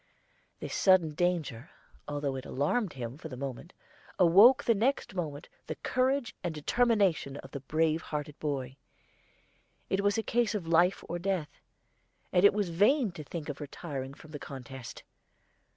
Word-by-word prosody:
This -, -, -6 dB
sudden 185 Hz, -5 st, +4 dB
danger, 165 Hz, -6 st, -1 dB, 0.4 s
although 145 Hz, -2 st, -2 dB
it 130 Hz, -, -5 dB
alarmed 170 Hz, -, 0 dB
him 125 Hz, +1 st, -6 dB
for 160 Hz, -, -8 dB
the 130 Hz, -, -7 dB
moment, 135 Hz, +5 st, -6 dB, 0.5 s
awoke 200 Hz, +9 st, +7 dB
the 230 Hz, -, +4 dB
next 230 Hz, +1 st, 0 dB
moment 155 Hz, -5 st, -4 dB, 0.2 s
the -, -, -3 dB
courage 260 Hz, 0 st, 0 dB
and 170 Hz, -3 st, -2 dB
determination 195 Hz, -, +1 dB
of 135 Hz, -, -11 dB
the 140 Hz, -, -5 dB
brave 155 Hz, +3 st, +1 dB
hearted 150 Hz, -2 st, -5 dB
boy. 135 Hz, -3 st, -3 dB, 1.1 s
It 190 Hz, -, +2 dB
was 205 Hz, +1 st, +2 dB
a 225 Hz, -, 0 dB
case 235 Hz, -2 st, +1 dB
of 195 Hz, -5 st, -3 dB
life 170 Hz, +3 st, +3 dB
or 175 Hz, +1 st, -3 dB
death, 180 Hz, -4 st, -2 dB, 0.7 s
and 180 Hz, -, +4 dB
it 200 Hz, -, +8 dB
was 205 Hz, -3 st, -1 dB
vain 210 Hz, -, +3 dB
to 155 Hz, -3 st, -8 dB
think 155 Hz, +1 st, -6 dB
of 145 Hz, 0 st, -6 dB
retiring 140 Hz, -2 st, -6 dB
from 155 Hz, -, -15 dB
the 145 Hz, -, -6 dB
contest. 130 Hz, -2 st, -9 dB
165 Hz, 160 wpm, -30 LUFS, 145-195 Hz, 1.1 s, it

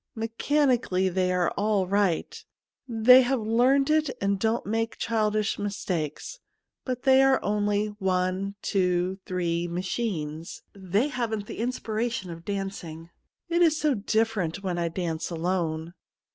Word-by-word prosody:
Mechanically 230 Hz, -4 st, +1 dB
they 185 Hz, 0 st, 0 dB
are 180 Hz, -1 st, +1 dB
all 205 Hz, -2 st, +1 dB
right; 200 Hz, -, 0 dB, 0.4 s
they 245 Hz, +2 st, +7 dB
have 260 Hz, +1 st, +1 dB
learned 255 Hz, +6 st, +3 dB
it 310 Hz, -1 st, +2 dB
and 200 Hz, 0 st, 0 dB
don't 225 Hz, +3 st, 0 dB
make 225 Hz, +2 st, -2 dB
childish 215 Hz, -2 st, 0 dB
mistakes; 190 Hz, -, -3 dB, 0.4 s
but 250 Hz, -2 st, -4 dB
they 265 Hz, -1 st, +6 dB
are 270 Hz, -1 st, +4 dB
only 205 Hz, 0 st, +1 dB
one 190 Hz, +1 st, -1 dB
two 180 Hz, 0 st, 0 dB
three 175 Hz, -2 st, -1 dB
machines. 170 Hz, -3 st, -4 dB
They 200 Hz, +7 st, 0 dB
haven't 225 Hz, -6 st, -2 dB
the -, -, -8 dB
in 235 Hz, +2 st, 0 dB
spiration 225 Hz, -5 st, -3 dB
of 165 Hz, 0 st, -9 dB
dancing. 185 Hz, -5 st, -5 dB, 0.4 s
It 340 Hz, 0 st, +1 dB
is 315 Hz, -3 st, +4 dB
so 300 Hz, -2 st, +2 dB
dif 225 Hz, +1 st, 0 dB
ferent 190 Hz, -1 st, -3 dB
when 180 Hz, -2 st, -2 dB
I 170 Hz, -, 0 dB
dance 165 Hz, -2 st, -3 dB
alone.' 170 Hz, -1 st, -2 dB
205 Hz, 140 wpm, -26 LUFS, 180-235 Hz, 0.4 s, they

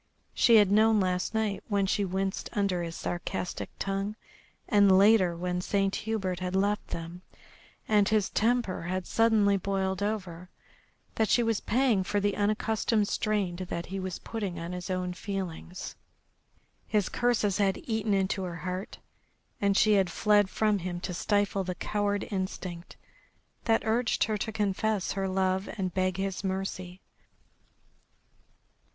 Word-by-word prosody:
She 235 Hz, -, +5 dB
had 205 Hz, -3 st, +6 dB
known 220 Hz, +1 st, +5 dB
last 185 Hz, +2 st, 0 dB
night, 215 Hz, -2 st, -1 dB
when 200 Hz, -2 st, +1 dB
she 200 Hz, +1 st, +1 dB
winced 190 Hz, +1 st, -2 dB
under 200 Hz, -5 st, 0 dB
his 165 Hz, -1 st, -5 dB
sarcastic 175 Hz, +1 st, -4 dB
tongue, 195 Hz, +2 st, -2 dB, 0.5 s
and 200 Hz, -2 st, +5 dB
later, 195 Hz, -4 st, +5 dB
when 180 Hz, +1 st, -2 dB
Saint 195 Hz, +1 st, 0 dB
Hubert 200 Hz, -5 st, -2 dB
had 185 Hz, 0 st, -3 dB
left 205 Hz, +2 st, +1 dB
them 170 Hz, +2 st, -6 dB, 0.7 s
and 210 Hz, -2 st, +3 dB
his 215 Hz, -3 st, +1 dB
temper 230 Hz, -3 st, +1 dB
had 185 Hz, +1 st, -2 dB
suddenly 215 Hz, -3 st, +3 dB
boiled 190 Hz, 0 st, -1 dB
over, 185 Hz, -4 st, -3 dB, 0.6 s
that 220 Hz, -1 st, +1 dB
she 240 Hz, -, +4 dB
was 225 Hz, -2 st, +1 dB
paying 235 Hz, -5 st, +2 dB
for 205 Hz, +2 st, 0 dB
the 205 Hz, 0 st, 0 dB
unaccustomed 215 Hz, +1 st, +1 dB
strain 205 Hz, -5 st, 0 dB
that 175 Hz, -2 st, -4 dB
he 195 Hz, -, -2 dB
was 185 Hz, -1 st, -4 dB
putting 200 Hz, -6 st, -5 dB
on 170 Hz, +1 st, -5 dB
his 180 Hz, +1 st, -6 dB
own 180 Hz, -1 st, -2 dB
feelings. 185 Hz, -2 st, -5 dB, 0.9 s
His 210 Hz, -3 st, +1 dB
curses 220 Hz, -5 st, +1 dB
had 195 Hz, -2 st, +2 dB
eaten 220 Hz, -3 st, 0 dB
into 190 Hz, 0 st, 0 dB
her 180 Hz, -2 st, -4 dB
heart, 185 Hz, +2 st, -4 dB, 0.6 s
and 200 Hz, -1 st, +3 dB
she 215 Hz, -, +5 dB
had 185 Hz, -, -2 dB
fled 205 Hz, +1 st, +3 dB
from 210 Hz, -1 st, +1 dB
him 175 Hz, 0 st, -4 dB
to 180 Hz, -, -4 dB
stifle 205 Hz, +1 st, +1 dB
the 180 Hz, -1 st, -4 dB
coward 205 Hz, 0 st, -1 dB
instinct 185 Hz, -3 st, -5 dB, 0.7 s
that 225 Hz, -2 st, +2 dB
urged 230 Hz, +2 st, +1 dB
her 215 Hz, -1 st, 0 dB
to 220 Hz, -, -2 dB
confess 210 Hz, -1 st, 0 dB
her 195 Hz, -1 st, -1 dB
love 190 Hz, 0 st, 0 dB
and 185 Hz, -3 st, -2 dB
beg 185 Hz, -1 st, 0 dB
his 195 Hz, 0 st, -3 dB
mercy. 190 Hz, -1 st, -4 dB
195 Hz, 150 wpm, -29 LUFS, 185-210 Hz, 0.9 s, had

